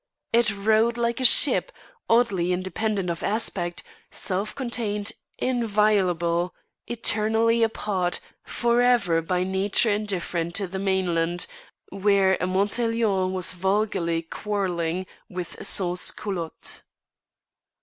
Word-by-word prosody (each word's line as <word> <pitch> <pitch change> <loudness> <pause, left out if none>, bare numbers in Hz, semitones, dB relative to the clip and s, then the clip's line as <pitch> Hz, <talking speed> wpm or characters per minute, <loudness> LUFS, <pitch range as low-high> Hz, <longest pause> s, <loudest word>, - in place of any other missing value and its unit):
It 235 -1 +4
rode 220 +3 +2
like 235 0 -1
a 255 - 0
ship, - - +7 0.4
oddly 200 -7 +2
independent 190 +1 -2
of 170 - -6
aspect, 190 -5 -1 0.3
self 195 +3 -2
contained, 225 -5 -2 0.3
inviolable, 200 -8 +1 0.3
eternally 230 0 +1
apart, 200 -5 0 0.2
for 240 0 +1
ever 215 -10 +3
by 180 +2 -1
nature 195 +4 +2
indifferent 180 -5 -2
to 200 - -1
the 190 +1 -6
mainland, 175 -3 0 0.4
where 195 -1 +2
a 180 - 0
Montaiglon 200 0 0
was 185 -1 +1
vulgarly 190 -3 0
quarrelling 180 -2 -3 0.2
with 180 -2 -7
sans 180 -2 +3
culottes. 175 -6 -5
195 Hz, 105 wpm, -24 LUFS, 180-220 Hz, 0.4 s, ship